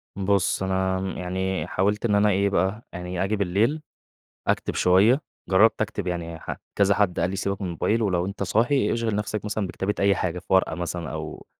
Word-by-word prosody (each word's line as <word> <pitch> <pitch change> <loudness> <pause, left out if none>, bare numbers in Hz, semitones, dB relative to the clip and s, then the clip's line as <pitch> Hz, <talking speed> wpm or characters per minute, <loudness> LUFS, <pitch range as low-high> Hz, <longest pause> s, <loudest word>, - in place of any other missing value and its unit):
بُص، 100 -1 +1
أنا 95 0 0
م 95 - -3
يعني 90 -2 -2
حاولت 105 +5 0
إن 105 -3 +2
أنا 105 +1 +4
إيه 100 +1 +2
بقى، 95 +4 0
يعني 90 0 -3
آجي 105 +2 0
بالليل 105 - +1 0.7
أكتب - - 0
شوية. 105 +10 +4 0.3
جرَّبت 105 +4 +4
أكتب، 105 -3 -2
يعني 85 -2 -4
ح - - -5 0.2
كذا 100 0 +3
حد 100 -4 +1
قال 90 - +1
لي: 95 - -3
"سيبك 100 +1 -2
من - - -2
الموبايل، 105 +7 0
ولو 90 -4 +1
أنت 100 0 -4
صاحي 120 +8 +2
اشغِل 115 -3 -1
نفسك 105 0 -3
مثلًا 105 -2 -2
بكتابة 95 +3 -2
أي 100 0 +4
حاجة، 90 0 -2
في - - -22
ورقة 95 - +3
مثلًا." 85 -2 -4
أو - - -6
95 Hz, 195 wpm, -25 LUFS, 90-105 Hz, 0.7 s, أنا